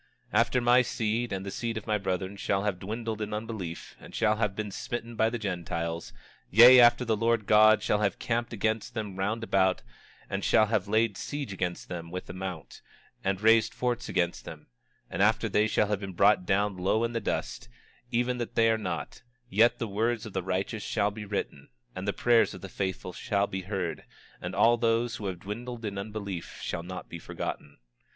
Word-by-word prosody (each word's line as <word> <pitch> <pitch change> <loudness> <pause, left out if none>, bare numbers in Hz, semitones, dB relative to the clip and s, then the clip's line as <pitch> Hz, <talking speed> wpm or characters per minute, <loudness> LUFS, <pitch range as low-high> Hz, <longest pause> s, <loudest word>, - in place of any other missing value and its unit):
26:15 - - +5
After 120 +2 +2
my 120 +1 +5
seed 115 -1 -1
and 95 0 -3
the 100 - -4
seed 115 +1 -3
of 110 - -6
my 105 -1 0
brethren 95 0 -2
shall 100 0 -1
have 100 -3 -1
dwindled 110 +2 -4
in 105 0 -3
unbelief, 105 -6 -6
and - - -12
shall 110 -1 +2
have 105 -3 0
been 105 -1 -4
smitten 120 +3 -5
by 110 0 +3
the 120 - -3
Gentiles; 85 -5 -3 0.4
yea, 120 +5 +9
after 120 +1 +6
the 110 -1 +2
Lord 115 0 +1
God 110 +1 +6
shall 105 - +2
have 100 -3 0
camped 120 0 -2
against 110 0 -2
them 105 -4 -4
round 110 +4 -1
about, 95 -3 +2 0.4
and 100 0 -3
shall 110 - +5
have 105 -3 0
laid 110 -1 +2
siege 145 -8 -4
against 90 -2 -3
them 85 -2 -6
with 90 +2 -6
a - - -9
mount, 95 -4 -7 0.4
and 95 0 -1
raised 110 0 +4
forts 125 -2 -2
against 85 -1 0
them; - - -10 0.4
and - - -3
after - - +3
they 105 +1 +2
shall 105 - +2
have 105 -2 0
been 95 -2 -6
brought 100 0 +4
down 100 0 +1
low 95 +5 +1
in 115 0 -1
the 115 - -1
dust, 120 0 -3 0.4
even 125 +1 0
that 120 - -4
they 115 0 +4
are 110 - +1
not, 85 -7 -5 0.3
yet 115 +4 +4
the 115 - -3
words 110 +3 -1
of 110 - -8
the 95 - -1
righteous 95 +4 -2
shall 105 0 0
be 105 0 -7
written, 100 0 -4 0.3
and 95 +2 -5
the - - +3
prayers 120 +2 +3
of - - -10
the 95 - -7
faithful 95 -1 -4
shall 100 +3 0
be 95 -1 -4
heard, 95 -2 -3 0.4
and 90 +2 -5
all 115 +4 +5
those 115 +1 +1
who 105 - -5
have 90 -2 -5
dwindled 115 +3 -6
in 100 -2 -3
unbelief 100 -4 -6
shall 85 - -3
not 90 +2 -7
be 85 - -8
forgotten. 75 -2 -6
105 Hz, 205 wpm, -28 LUFS, 95-115 Hz, 0.4 s, yea